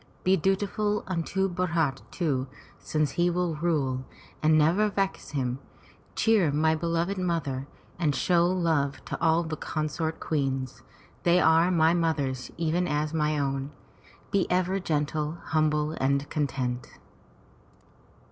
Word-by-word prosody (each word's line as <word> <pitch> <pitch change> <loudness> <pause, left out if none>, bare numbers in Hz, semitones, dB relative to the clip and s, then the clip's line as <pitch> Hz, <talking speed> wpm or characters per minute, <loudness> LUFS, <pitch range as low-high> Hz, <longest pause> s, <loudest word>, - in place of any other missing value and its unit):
Be 185 +1 +4
dutiful 205 +3 0
unto 185 +2 -1
Bharat, 170 -7 0
too, 140 -7 -1 0.3
since 155 -2 -1
he 175 0 +2
will 175 -1 0
rule, 145 -6 0 0.4
and 155 0 +4
never 175 +8 +3
vex 195 -1 -2
him; 130 -3 -2 0.6
cheer 210 -9 +3
my 160 +2 +2
beloved 170 +4 -1
mother, 145 -7 -2 0.3
and 150 -5 +1
show 170 +4 +3
love 165 -6 0
to - - -5
all 165 0 +3
the 160 -1 -4
consort 155 +1 -3
queens 135 -5 -2 0.2
— - - -29
they 175 +1 +4
are 165 +1 +5
my 165 -2 +4
mothers 145 -7 -1
even 170 +2 0
as 150 +1 -1
mine 150 -1 +1
own. 135 0 -2 0.6
Be 200 -2 +1
ever 185 +2 +1
gentle, 155 -1 -1
humble 155 -1 +1
and 140 -1 0
content." 130 -5 -2
160 Hz, 130 wpm, -27 LUFS, 145-175 Hz, 0.6 s, are